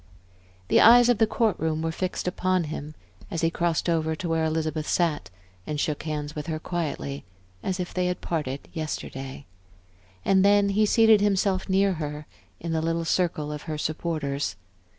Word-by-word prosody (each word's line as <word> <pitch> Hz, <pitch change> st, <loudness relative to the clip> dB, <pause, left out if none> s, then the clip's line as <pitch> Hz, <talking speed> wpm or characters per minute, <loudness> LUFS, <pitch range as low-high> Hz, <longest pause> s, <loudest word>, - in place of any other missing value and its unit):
The -, -, +5 dB
eyes 240 Hz, +1 st, +8 dB
of 240 Hz, -4 st, +3 dB
the 225 Hz, -, +5 dB
court 220 Hz, -2 st, +1 dB
room 160 Hz, 0 st, -1 dB
were 165 Hz, -, 0 dB
fixed 185 Hz, +2 st, -3 dB
upon 185 Hz, 0 st, +1 dB
him 150 Hz, 0 st, -6 dB, 0.3 s
as 165 Hz, -, -3 dB
he 165 Hz, 0 st, +2 dB
crossed 170 Hz, -1 st, 0 dB
over 160 Hz, -2 st, +1 dB
to 175 Hz, -, -5 dB
where 165 Hz, -1 st, +1 dB
Elizabeth 155 Hz, -1 st, -1 dB
sat 170 Hz, -4 st, 0 dB, 0.4 s
and 150 Hz, -, -2 dB
shook 150 Hz, 0 st, -1 dB
hands 150 Hz, -2 st, -4 dB
with 150 Hz, +1 st, -5 dB
her 160 Hz, -1 st, -2 dB
quietly, 155 Hz, -4 st, -4 dB, 0.4 s
as 185 Hz, -, -2 dB
if 180 Hz, -, -4 dB
they 180 Hz, -1 st, 0 dB
had 180 Hz, 0 st, -2 dB
parted 145 Hz, -5 st, -3 dB
yesterday. 135 Hz, -3 st, -5 dB, 0.8 s
And 190 Hz, -1 st, +4 dB
then 200 Hz, 0 st, +5 dB
he 210 Hz, +2 st, +3 dB
seated 225 Hz, -1 st, +5 dB
himself 195 Hz, -2 st, +1 dB
near 195 Hz, +1 st, +3 dB
her, 150 Hz, 0 st, -5 dB, 0.3 s
in 170 Hz, -, -4 dB
the 160 Hz, -1 st, 0 dB
little 165 Hz, +1 st, -1 dB
circle 160 Hz, -4 st, 0 dB
of 150 Hz, 0 st, -5 dB
her 155 Hz, -, -2 dB
supporters. 150 Hz, -, -2 dB
165 Hz, 175 wpm, -26 LUFS, 155-185 Hz, 0.8 s, eyes